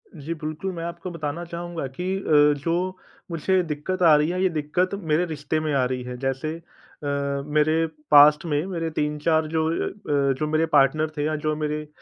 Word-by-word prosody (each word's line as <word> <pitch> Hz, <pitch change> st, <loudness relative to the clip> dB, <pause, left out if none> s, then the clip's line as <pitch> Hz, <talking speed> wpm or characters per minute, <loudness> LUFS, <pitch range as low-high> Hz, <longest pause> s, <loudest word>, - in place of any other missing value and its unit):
जी, 155 Hz, +2 st, -5 dB
बिल्कुल, 155 Hz, +4 st, -4 dB
मैं 165 Hz, -, -5 dB
आपको 170 Hz, +1 st, -6 dB
बताना 165 Hz, 0 st, -4 dB
चाहूँगा 170 Hz, -2 st, -5 dB
कि 180 Hz, +8 st, -3 dB
अ, 150 Hz, -5 st, +4 dB
जो 180 Hz, +3 st, -1 dB, 0.3 s
मुझे 185 Hz, +3 st, +1 dB
दिक्कत 160 Hz, +4 st, -4 dB
आ 160 Hz, -3 st, +7 dB
रही 150 Hz, +2 st, +2 dB
है, 180 Hz, +1 st, -1 dB
ये 190 Hz, -, +4 dB
दिक्कत 165 Hz, +5 st, -1 dB, 0.2 s
मेरे 165 Hz, +4 st, +3 dB
रिश्ते 155 Hz, -1 st, -2 dB
में 155 Hz, -2 st, -2 dB
आ 135 Hz, -, +2 dB
रही 125 Hz, 0 st, -3 dB
है। 125 Hz, 0 st, -6 dB
जैसे 135 Hz, +4 st, -2 dB, 0.5 s
अ, -, -, -3 dB, 0.4 s
मेरे 155 Hz, +2 st, +2 dB, 0.3 s
पास्ट 150 Hz, +2 st, +7 dB
में 150 Hz, +1 st, 0 dB
मेरे 165 Hz, -3 st, -3 dB
3-4 155 Hz, +1 st, 0 dB
जो 160 Hz, 0 st, 0 dB
अ -, -, -1 dB
अ, 140 Hz, -8 st, 0 dB
जो 155 Hz, -, 0 dB
मेरे 155 Hz, +1 st, +2 dB
पार्टनर 150 Hz, +3 st, +4 dB
थे 145 Hz, -, 0 dB
या 155 Hz, 0 st, 0 dB
जो 155 Hz, -, +1 dB
मेरे 150 Hz, 0 st, -2 dB
अ, 150 Hz, -, -16 dB
155 Hz, 200 wpm, -24 LUFS, 150-170 Hz, 0.5 s, आ